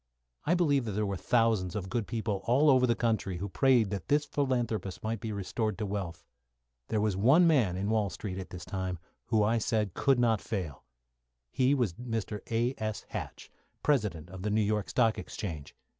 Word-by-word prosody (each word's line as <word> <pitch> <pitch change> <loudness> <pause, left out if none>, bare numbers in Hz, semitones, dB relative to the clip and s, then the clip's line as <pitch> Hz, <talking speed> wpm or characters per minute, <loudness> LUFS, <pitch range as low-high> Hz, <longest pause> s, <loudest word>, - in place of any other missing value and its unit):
I 175 - +3
believe 145 -7 +2
there 105 0 -1
were 100 -1 -2
thousands 110 -3 +1
of 95 -3 -3
good 115 0 -2
people 110 -4 -2
all 140 +5 +5
over 130 -1 +4
the 120 - +2
country 110 -6 0
who 100 +3 -4
prayed 120 0 +3
that 100 -4 -4
this 145 +1 +2
philanthropist 120 -9 -1
might 110 0 -2
be 110 - -4
restored 105 +1 -2
to 105 - -2
wealth. 95 -5 -4 0.6
There 110 - 0
was 105 -2 +1
one 135 - +5
man 125 - +3
in 100 +2 -2
Wall 110 -3 +1
Street 95 0 -5
at 95 - -7
this 90 -1 -8
time 95 -2 -3 0.3
who 110 -3 +3
I 115 +2 +2
said 105 -4 0
could 135 -2 +3
not 115 -4 +2
fail. 90 -11 -5 0.7
He 130 +2 +3
was 120 -10 0
Mr. 115 -1 -4
A.S. 115 -2 -1
Hatch, - - -7 0.3
President 105 - 0
of 95 -1 -8
the 105 - -1
New 105 +1 +2
York 105 -1 0
Stock 115 -3 +2
Exchange. 80 -5 -6
110 Hz, 190 wpm, -30 LUFS, 95-120 Hz, 0.7 s, all